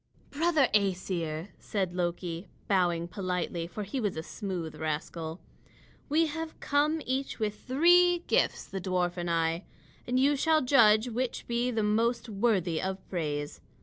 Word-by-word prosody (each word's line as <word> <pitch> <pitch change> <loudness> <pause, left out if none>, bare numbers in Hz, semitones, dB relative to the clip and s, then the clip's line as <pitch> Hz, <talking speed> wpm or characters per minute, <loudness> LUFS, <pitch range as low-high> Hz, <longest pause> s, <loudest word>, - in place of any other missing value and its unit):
"Brother 310 -2 +3
Æsir," 180 -4 0
said 190 -4 -2
Loki, 175 0 -3 0.2
bowing 175 -3 +2
politely, 180 -3 -3
for 190 +5 -5
he 205 +7 -4
was 205 -8 -1
a 160 - -3
smooth 180 -4 -5
rascal, 160 +2 -4 0.7
"we 320 +3 +4
have 320 +1 -5
come 300 +2 +1
each 265 +2 -2
with 210 -2 -1
three 350 +5 +4
gifts, - - +1
the 195 - -6
dwarf 180 -1 0
and 175 -1 -3
I; 165 +1 0 0.4
and 250 +1 +1
you 285 +2 +4
shall 315 +1 +3
judge 230 -4 +5
which 245 +1 -3
be 240 +1 0
the 225 -3 0
most 230 +3 +1
worthy 195 -6 +1
of 190 0 -4
praise. 145 -5 -3
200 Hz, 150 wpm, -29 LUFS, 175-255 Hz, 0.7 s, judge